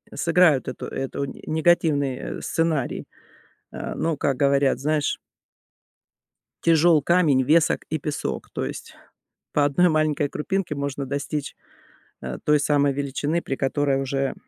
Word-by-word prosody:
сыграют 170 -5 +3
это - - -5
это 135 +1 -4
негативный, 155 -3 +1
э, - - -6
сценарий. 160 -6 -1 0.7
Э, - - -5
ну, 165 -2 -1
как 135 -2 0
говорят, 140 0 +2
знаешь 150 +1 0 1.5
тяжел 165 -1 +5
камень, 150 -4 +3
весок 155 +4 +3
и 155 - -1
песок, 145 +1 -4
то - - -3
есть - - -8 0.6
по 145 - +3
1 175 +6 +3
маленькой 155 -2 +1
крупинке 185 +3 -2
можно 140 0 -3
достичь, 140 +2 -4 0.7
э, 65 -1 -5
той 150 0 +3
самой 145 -1 +2
величины, 145 +4 -2
при 135 - -3
которой 135 0 0
уже 135 0 -1
145 Hz, 130 wpm, -24 LUFS, 140-160 Hz, 1.5 s, тяжел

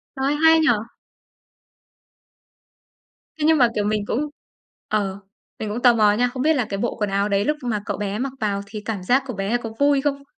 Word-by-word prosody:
Trời 265 0 -2
ơi, - - +1
hay 320 0 +7
nhỉ! 315 - +2 2.7
Thế 300 - 0
nhưng 320 -1 +5
mà, 245 -3 +5
kiểu, 210 - 0
mình 210 -1 -1
cũng 290 +8 -2 0.6
ờ, 200 -2 -1 0.4
mình 215 - -4
cũng 230 +4 -4
tò 245 -1 +6
mò 210 -2 +4
nha, 245 +3 +2
không 255 - -4
biết 315 +2 +3
là 250 -6 0
cái 195 - -3
bộ 235 - -2
quần 210 -1 0
áo 200 +1 0
đấy 200 +1 +1
lúc 300 0 0
mà 215 -4 -1
cậu - - -3
bé 205 +1 -3
mặc 270 0 -3
vào 200 -2 -1
thì 210 0 -7
cảm 205 -5 -4
giác 260 +7 +2
của 250 - -4
bé 200 +4 -1
có 230 -2 -6
vui 285 -1 +3
không? 280 -1 -2
225 Hz, 220 wpm, -22 LUFS, 205-270 Hz, 2.7 s, hay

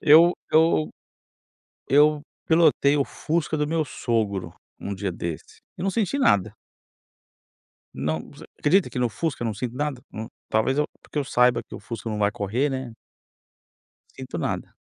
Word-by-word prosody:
Eu 165 +3 +7 0.2
eu 155 - +4 1.0
eu 150 +2 +5 0.3
pilotei 155 -3 +4
o 140 - +2
Fusca 160 0 -2
do 150 0 0
meu 160 0 0
sogro 105 -10 -2 0.3
um 100 - -4
dia 100 0 -3
desse, 85 -2 -6 0.2
eu - - -5
não 195 - +1
senti 225 +5 0
nada. 100 - +3 1.4
Não 80 +1 -3
você - - -13
acredita 180 +5 +3
que - - -4
no 125 -1 +2
Fusca 140 +3 -3
eu - - 0
não 110 - -2
sinto 120 +3 -4
nada? 145 -3 -2
Na 110 +1 -6 0.2
talvez 110 +6 +1
eu 150 - +2 0.2
porque - - -6
eu 145 - 0
saiba 125 -2 +3
que - - -13
o - - -7
Fusca 115 -1 -6
não 105 -1 -3
vai 100 -1 +3
correr, 115 +9 0
né. 130 -3 -4 1.2
Sinto - - -6
nada. - - -3
130 Hz, 165 wpm, -25 LUFS, 105-155 Hz, 1.4 s, Eu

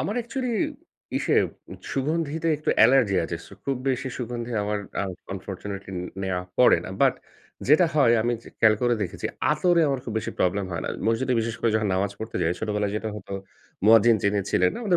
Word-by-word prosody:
আমার 205 - -2
অ্যাকচুয়ালি 245 +1 -3 0.7
ইসে - - +1 0.6
সুগন্ধিতে 155 +3 -1
একটু 150 - -1
অ্যালার্জি 115 -3 +5
আছে। 85 - -3
ছু - - -16
খুব 135 -1 0
বেশি 130 +1 -1
সুগন্ধি 120 -1 -4
আমার, 105 0 -1 0.2
আ - - 0 0.3
আনফরচুনেটলি, 95 0 -6 0.3
নেওয়া 90 -1 -1 0.2
পড়ে - - +6
না। - - -6
বাট - - +5 0.5
যেটা 155 +5 +6
হয়, 140 -6 +5
আমি 120 +2 +1 0.3
খেয়াল 110 -1 +6
যে - - -17
করে 120 -1 +3
দেখেছি, 90 - -3 0.3
আতরে 170 +3 +3
আমার 135 -2 -1
খুব 115 - -5
বেশি 110 - -4
প্রবলেম 95 +2 +1
হয় 85 - -3
না। - - -2 0.2
মসজিদে, 125 +3 +1
বিশেষ 115 0 -2
করে 115 - +2
যখন 110 -1 +1
নামাজ 95 +1 0
পড়তে 110 - -5
যাই, 85 - +2
ছোটবেলায় 105 -2 -1
যেটা 110 +1 -3
হতো, 100 -1 -9 0.5
মুয়াজ্জিন 115 +1 +7
যিনি 100 0 +2
ছিলেন 90 0 +3
না, - - -5
উনি 180 -3 +4
115 Hz, 190 wpm, -25 LUFS, 100-135 Hz, 0.7 s, মুয়াজ্জিন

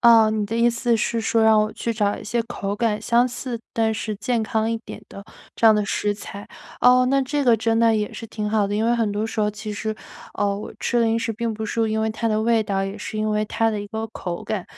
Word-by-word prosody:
啊， 230 -2 +7
你 215 -1 -1
的 225 - -4
意 235 +1 +4
思 235 0 +1
是 230 +1 -1
说 225 0 +1
让 220 -1 +6
我 215 0 -1
去 235 - -3
找 205 -2 0
一 - - -9
些 235 +3 -1
口 200 -4 -4
感 215 -2 0
相 240 +1 +3
似， 245 -1 -5
但 225 -1 +1
是 215 0 -3
健 230 +3 -1
康 220 +1 0
一 230 - 0
点 - - -9
的 200 - -10 0.3
这 230 - +4
样 220 - +8
的 210 -1 +1
食 205 0 -1
材。 200 0 -9 0.3
哦， 250 0 +6
那 275 +1 +3
这 290 +2 -1
个 240 -4 +5
真 225 +1 0
的 230 -1 +4
也 210 0 -2
是 230 - -7
挺 210 -1 -4
好 210 -1 +2
的， 205 - -2
因 220 - +1
为 240 - +3
很 225 -3 0
多 210 +2 -1
时 225 - -3
候 210 0 +2
其 210 +1 -6
实， 215 +1 -3 0.4
呃， 200 -1 0
我 205 - -7
吃 240 - 0
零 225 0 +2
食 225 0 -2
并 230 +1 -2
不 220 0 -5
是 225 0 0
因 220 0 0
为 220 - +1
它 225 +1 -2
的 215 -1 +1
味 225 0 +2
道， 195 -2 -1
也 195 +2 -5
是 215 - -6
因 215 0 0
为 210 0 +1
它 225 +1 +1
的 210 - -3
一 205 - -6
个 220 +1 -4
口 175 -5 -6
感。 205 -5 -3
220 Hz, 290 characters per minute, -22 LUFS, 210-230 Hz, 0.4 s, 样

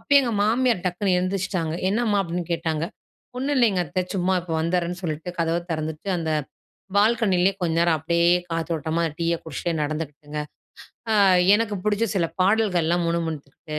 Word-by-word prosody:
அப்பயே 285 0 +5
எங்க 240 -3 -1
மாமியார் 230 -2 +2
டக்குனு 180 +2 0
எந்திருச்சுட்டாங்க. 185 -3 -2 0.2
"என்னம்மா?" 215 -2 +1
அப்பிடின்னு 175 -1 -4
கேட்டாங்க. 165 -1 -1 0.5
ஒன்னும் 280 +3 -1
இல்லேங்க 220 -7 +3
அத்தை. 170 +5 -1
சும்மா 185 +1 +1
இப்ப 175 -1 -8
வந்துர்றேன்னு 175 +1 -1
சொல்லிட்டு, 160 +1 -3
கதவ 165 0 +1
திறந்துட்டு 155 +2 -4
அந்த 160 -2 -2 0.6
பால்கனியிலே 200 -3 +3
கொஞ்ச 170 -2 0
நேரம் 170 -1 +3
அப்பிடியே 170 +2 +2 0.2
காத்தோட்டமா 165 0 -1
டீய 170 0 +1
குடிச்சிட்டே 170 +1 -3
நடந்துக்கிட்டுங்க. 150 0 -4 0.7
அ - - +3 0.4
எனக்கு 215 -1 0
பிடிச்ச 210 +1 +1
சில 175 -4 +2
பாடல்கள்லாம் 180 -4 +2
முணுமுணுத்துக்கிட்டு, 155 -2 -4
175 Hz, 140 wpm, -24 LUFS, 165-200 Hz, 0.7 s, அப்பயே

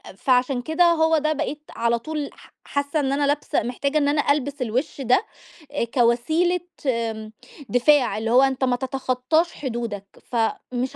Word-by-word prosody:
فعشان 250 +3 +1
كده 315 +6 +1
هو 320 -1 +4
ده 310 +1 +1
بقيت 295 +1 -3
على 235 0 +1
طول 300 +3 -4
ح - - -18
حاسة 285 +2 -1
إن 270 -1 0
أنا 285 0 +1
لابسة 290 +1 0
محتاجة 280 +5 -1
إن 285 -1 +2
أنا 290 0 +2
ألبس 285 -1 -1
الوش 255 +5 -2
ده، 255 - +2 0.5
آآ، 290 - -1
كوسيلة 245 +10 +2 0.3
آمم، 225 -3 -2 0.4
دفاع، 250 +1 +3
اللي 225 +1 -2
هو 250 - +6
أنت 270 -1 +1
ما 250 -1 +2
تتخطاش 265 +5 0
حدودك. 235 -7 -4 0.3
فمش 245 +3 -2
265 Hz, 160 wpm, -23 LUFS, 240-295 Hz, 0.5 s, هو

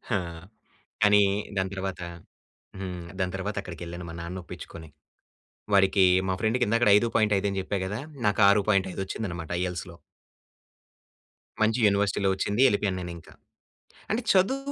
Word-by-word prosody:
ఆ! - - +3 0.9
కానీ 105 0 +6 0.3
దాని 95 0 0
తర్వాత 95 -1 -4 0.8
హ్మ్. 90 -2 -5 0.2
దాని 90 0 -1
తర్వాత 100 +2 -4
అక్కడికెళ్ళాను 85 -1 -8
మా - - -7
నాన్ననొప్పిచ్చుకొని. 85 -2 -8 0.8
వాడికీ 95 0 +5 0.2
మా 95 - +1
ఫ్రెండ్‌కి 115 +3 +1
ఇందాకడ 115 +1 +3
5.5 105 -3 +1
అని 100 -1 -2
జెప్పా 95 +1 -3
గదా! 105 +4 -4 0.3
నాకు 105 +1 +1
6.5 100 -2 +2
వచ్చిందనమాట 85 -5 -5
ఐఎల్స్‌లో. 90 -1 -4 1.7
మంచి 110 +2 +2
యూనివర్సిటీలో 100 -1 +1
వచ్చింది. 100 +4 -1
యెళ్ళిపోయాను 100 -4 0
నేనింకా. 85 -2 -9 0.8
అంటే 220 +3 0
చదువు 265 +9 +2
95 Hz, 120 wpm, -27 LUFS, 90-105 Hz, 1.7 s, కానీ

